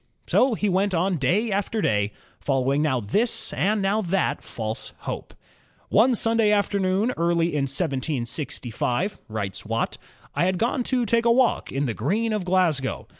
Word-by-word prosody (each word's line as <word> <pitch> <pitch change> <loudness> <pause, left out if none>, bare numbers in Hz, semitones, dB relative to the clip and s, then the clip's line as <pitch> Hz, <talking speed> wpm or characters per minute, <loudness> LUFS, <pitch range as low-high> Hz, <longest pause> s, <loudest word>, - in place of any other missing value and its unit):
So 255 -3 +3
he 210 - -1
went 195 0 +1
on 180 +2 +1
day 195 - +1
after 205 +3 -1
day, 105 - +1 0.3
following 135 +1 +1
now 130 -5 +1
this 210 - 0
and 205 +1 +1
now 200 +3 +2
that 190 0 0
false 110 -1 -5
hope. - - -6 0.5
"One 240 +4 +4
Sunday 225 -1 +2
afternoon 200 +1 +1
early 170 0 +2
in 140 -2 +1
1765," 135 - -2
writes 100 -3 -4
Watt, 115 +1 -2 0.3
"I - - +1
had 185 0 +1
gone 240 +6 0
to 250 -2 +1
take 230 +2 +2
a 235 - +5
walk 250 0 +2
in 135 +2 -1
the 120 - -1
Green 210 - 0
of 210 -4 -2
Glasgow. 175 -8 +1
185 Hz, 160 wpm, -24 LUFS, 135-210 Hz, 0.5 s, a